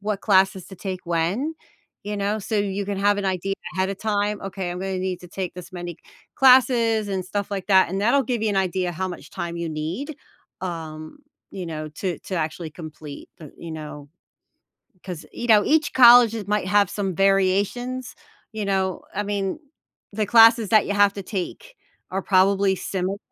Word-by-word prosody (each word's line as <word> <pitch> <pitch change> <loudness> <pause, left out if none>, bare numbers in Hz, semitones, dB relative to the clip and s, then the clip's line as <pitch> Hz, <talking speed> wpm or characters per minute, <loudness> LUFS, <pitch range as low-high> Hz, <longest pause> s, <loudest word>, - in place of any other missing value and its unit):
what 205 -1 -2
classes 190 -3 +2
to 190 - -11
take 185 0 -5
when, 175 - -1 0.5
you 210 +1 -4
know, 205 +2 -1
so 215 +2 -3
you 200 0 -1
can 200 0 -3
have 205 +1 +3
an 200 - -3
idea 190 0 -1 0.2
ahead 190 +1 0
of 195 - -6
time, 210 -1 -1
"Okay, 195 -1 -4
I'm 180 - -6
gonna 190 0 -3
need 185 -1 -3
to 180 - -12
take 185 0 -5
this 180 +1 -10
many 175 -2 -6 0.4
classes," 240 -4 +4
and 190 -2 -2
stuff 200 +2 -3
like 195 -1 -4
that, 190 -2 +5
and 190 +3 -3
that'll 245 +6 +3
give 240 -2 -2
you 220 - +1
an 205 - -1
idea 185 -1 0
how 180 +3 -3
much 180 -2 -8
time 170 0 -5
you 170 -1 -3
need, 170 - -4 0.4
um, 160 - -6 0.3
you 185 -3 -6
know, 155 -1 -5
to 175 +3 -4
to 190 - -6
actually 160 0 -3
complete 155 -2 -10
the 155 -4 -12
you 170 - -9
know 150 -2 -8 0.9
'cause, 180 -4 -7
you 240 - -5
know, 210 -2 +6
each 310 0 +2
colleges 235 -4 +7
might 210 -2 0
have 205 -1 +4
some 195 -4 -3
variations, 195 +7 +1 0.4
you 215 -1 -4
know, 190 -2 -1
I 205 - -1
mean, 200 +2 -2 0.5
the 210 +1 -1
classes 225 -1 +6
that 215 -2 +5
you 200 - -1
have 205 -1 +4
to 200 - -7
take 205 - -6 0.3
are 190 +1 -2
probably 195 +1 +3
similar, 190 +1 -3
195 Hz, 190 wpm, -23 LUFS, 180-210 Hz, 0.9 s, colleges